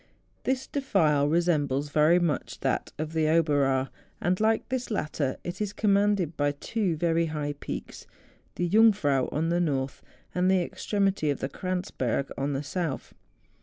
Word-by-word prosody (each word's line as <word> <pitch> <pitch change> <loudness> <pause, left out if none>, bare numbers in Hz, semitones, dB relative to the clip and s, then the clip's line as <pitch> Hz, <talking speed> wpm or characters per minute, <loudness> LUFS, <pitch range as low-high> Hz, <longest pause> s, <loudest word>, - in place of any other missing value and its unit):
This 260 0 0
defile 155 - +2
resembles 150 -4 +1
very 155 +4 +4
much 170 -4 -1
that - - -1
of 155 +1 -4
the 160 -1 +2
Oberaar; 145 -5 +2 0.3
and, 180 +1 0
like 220 +1 +2
this 255 -1 -2
latter, 150 - -2
it 175 +4 -5
is 205 -1 -2
commanded 200 -5 +2
by 145 0 +1
two 190 +4 -1
very 165 +1 +1
high 150 -2 -3
peaks; - - -7 0.5
the 175 - 0
Jungfrau 190 - +4
on 160 +2 0
the 170 +1 +1
north, 135 -5 -1 0.3
and 180 +1 +2
the 190 -2 +3
extremity 195 -4 0
of 140 - -1
the 135 - -3
Kranzberg 160 -7 -2
on 140 +1 -1
the 135 +2 -2
south. 155 -1 -3
165 Hz, 155 wpm, -27 LUFS, 145-190 Hz, 0.5 s, very